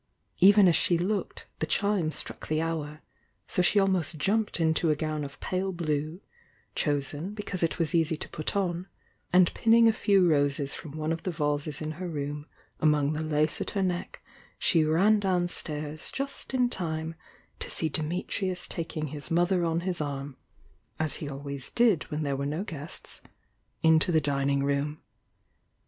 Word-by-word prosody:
Fven 200 0 +8
as 170 - +5
she 175 - +3
looked, 195 +4 -2
the - - -1
chime 200 -6 +1
struck - - -7
the 155 0 0
hour, 155 -2 -3 0.2
— - - -44
so - - +1
sne 200 +3 +4
almost 185 -5 0
jumped 210 +4 +1
into 160 0 +2
a 155 - +3
gown 155 0 -2
of 140 -1 -8
pale 190 +1 -2
blue, 155 0 -2 0.5
chosen 145 +6 -1
because 205 -3 -3
it 165 - +1
was 165 -4 0
easy 165 -1 +2
to - - -5
put 155 - -3
on, 180 -2 -1 0.4
and 180 -1 +5
pinning 230 0 +5
a 225 - +5
few 195 -4 +3
roses 145 -2 +2
from 150 -4 -7
one 155 +1 -1
of 165 0 -2
the - - -3
vases 150 -2 -1
in 155 - -3
her 180 - -3
room 145 -1 -4 0.3
among 150 -1 +3
the 155 - -2
lace 155 0 +1
at - - -2
her 195 - +2
neck, 180 -1 -3 0.3
she 165 -2 +3
ran 190 +8 +4
downstairs 165 -5 -2
just 275 -1 -4
in 250 -1 +3
time 160 -7 -3 0.5
to - - -5
see 160 - 0
Dimitrius 180 +4 -2
taking 155 -2 -4
his 145 +2 -8
mother 175 +1 +2
on 165 0 0
his 180 -2 -2
arm, 140 -1 -4 0.6
as 155 -1 -1
he 145 - -5
always 140 -1 -5
did 230 -9 +3
when 150 +1 -2
there 140 -1 -1
were 140 +1 -2
no 155 +6 -2
guests, 160 -4 -6 0.6
into 160 +2 +5
the 160 - +4
dining 140 -1 +1
room. 140 +2 -1
160 Hz, 175 wpm, -28 LUFS, 150-185 Hz, 0.6 s, Fven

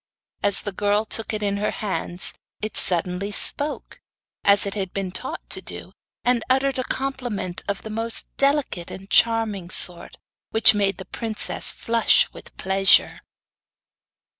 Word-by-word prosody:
As 200 -1 +3
the 205 - -4
girl 205 +2 +1
took 225 +1 +3
it 215 -1 -3
in 200 0 0
her 210 +1 0
hands 185 -3 -2 0.3
it 215 0 -4
suddenly 180 +3 0
spoke, 290 +8 -2 0.4
as 200 0 +5
it 200 - -3
had 190 -3 -4
been 195 -2 -3
taught 255 +8 -5
to - - +1
do, - - -8 0.3
and 245 -2 +2
uttered 265 0 +2
a - - 0
compliment 245 -10 -3
of 200 -1 -3
the 220 - -7
most 225 +1 -4
delicate 275 - +1
and 195 +1 -10
charming 225 -6 +2
sort, 175 -2 0 0.3
which 225 +2 +6
made 200 -1 +1
the 190 - -8
princess 225 -2 -1
flush 230 0 +3
with - - -14
pleasure. 190 0 +3
205 Hz, 150 wpm, -23 LUFS, 195-230 Hz, 0.4 s, which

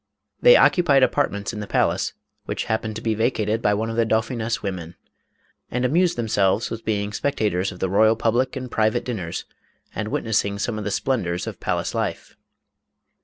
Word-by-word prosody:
They - - +8
occupied 145 -7 +4
apartments 110 -7 0
in 105 - -5
the 105 - -5
palace, - - +1 0.3
which - - -3
happened 110 -1 -2
to 115 - -6
be 110 - +1
vacated 110 -1 0
by 105 -2 +2
one 110 +2 -1
of 115 - -5
the 115 - +4
dauphiness' 115 +1 -1
women, 90 -4 -5 0.7
and 125 +1 -1
amused 170 +5 +2
themselves 110 -2 +1
with 115 0 -5
being 105 -1 -1
spectators 100 -7 0
of 90 - -10
the 95 - -1
royal 110 +4 +4
public 120 +4 0
and 130 -2 -6
private 110 -1 +1
dinners, 95 -9 -4 0.5
and 105 +1 -3
witnessing 100 -2 0
some 110 +2 -2
of 105 - -6
the - - -1
splendors 90 -7 -1
of - - -7
palace - - -2
life. - - -3
110 Hz, 175 wpm, -23 LUFS, 100-120 Hz, 0.7 s, They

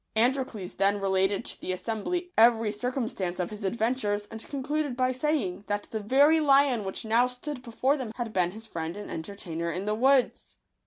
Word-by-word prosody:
Androcles 240 -5 0
then 200 +1 +2
related 195 0 +1
to - - -5
the - - -3
assembly 230 - -3
every 225 -1 +5
circumstance 210 -5 -3
of 180 - -2
his 210 0 -8
adven 225 +4 +1
tures, 205 -5 -2
and 225 0 -7
concluded 290 -1 -2
by 255 0 +2
saying, 255 -9 -1
that 205 0 -1
the 220 - -2
very 280 +9 +4
lion 275 -6 +4
which 190 +3 -5
now 230 +3 +4
stood 250 +2 -6
before 260 +3 0
them 250 -5 -5
had 235 -3 -4
been 180 -2 +2
his 220 +4 -10
friend 165 -3 -5
and 205 - -7
entertainer 170 -1 -4
in 180 +4 -4
the 210 - 0
woods. 260 +3 +2
225 Hz, 190 wpm, -28 LUFS, 200-260 Hz, -, every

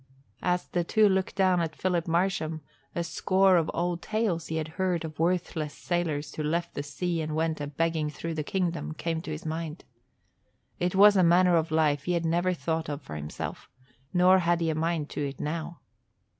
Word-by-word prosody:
As 180 0 0
the 175 - -1
two 215 +5 +4
looked 190 -1 0
down 185 -2 +3
at 160 -2 -3
Philip 175 -2 0
Marsham, 165 -2 0 0.3
a 170 - 0
score 190 +3 +3
of 165 -2 +2
old 175 0 -1
tales 215 -6 -1
he 160 - -3
had 160 -1 -2
heard 180 -1 -1
of 155 -1 -8
worthless 165 -3 -1
sailors 155 -4 -2
who - - -4
left 165 +3 -1
the - - -3
sea 165 +3 -2
and 155 0 -3
went 160 -1 0
a 145 - -3
begging 160 +1 0
through 165 +3 -5
the 155 - -2
kingdom 170 -3 -2
came 165 -1 -2
to 160 - -8
his 155 +1 -6
mind. 160 0 -4 0.9
It 180 +1 0
was 205 +1 +8
a 185 - +5
manner 175 +1 +5
of 165 -1 +1
life 150 -2 +2
he 180 - 0
had 170 -1 0
never 175 +3 +2
thought 160 -1 -2
of 145 -1 -5
for 75 - -8
himself, 75 0 -6 0.4
nor 185 +1 +5
had 170 -1 +2
he 165 -1 +1
a - - -2
mind 160 -1 -1
to 145 - -3
it 135 -1 -8
now. 165 +2 -4
165 Hz, 200 wpm, -28 LUFS, 155-180 Hz, 0.9 s, was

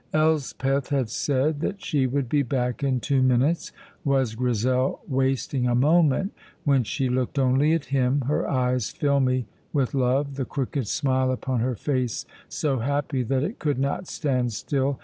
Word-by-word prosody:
Elspeth 140 -3 +1
had 135 -6 0
said 145 +4 0
that 195 +5 -2
she 135 -4 +1
would 135 0 -1
be 145 +4 +2
back 125 0 -1
in 130 -2 +1
two 135 +2 +1
minutes. 130 +6 +2 0.3
Was 135 -5 +1
Grizel 125 +2 0
wasting 130 -1 0
a 120 - +2
moment 155 - +3 0.3
when 140 -3 +3
she 130 +4 -1
looked 125 +2 -1
only 135 +4 +3
at 165 -3 0
him, 135 +1 +2
her 140 +4 -1
eyes 125 -3 +1
filmy 130 -3 +1 0.3
with 135 -4 0
love, 135 +1 +1
the 135 - -1
crooked 135 -3 -3
smile 130 +1 +1
upon 130 -1 -2
her 125 +2 0
face 130 -1 -2 0.2
so 140 -4 -1
happy 140 +2 -1
that 130 +2 0
it 195 +10 -4
could 145 -4 0
not 140 +7 -1
stand 125 -5 -1
still? 135 +6 -1
135 Hz, 165 wpm, -25 LUFS, 125-145 Hz, 0.3 s, moment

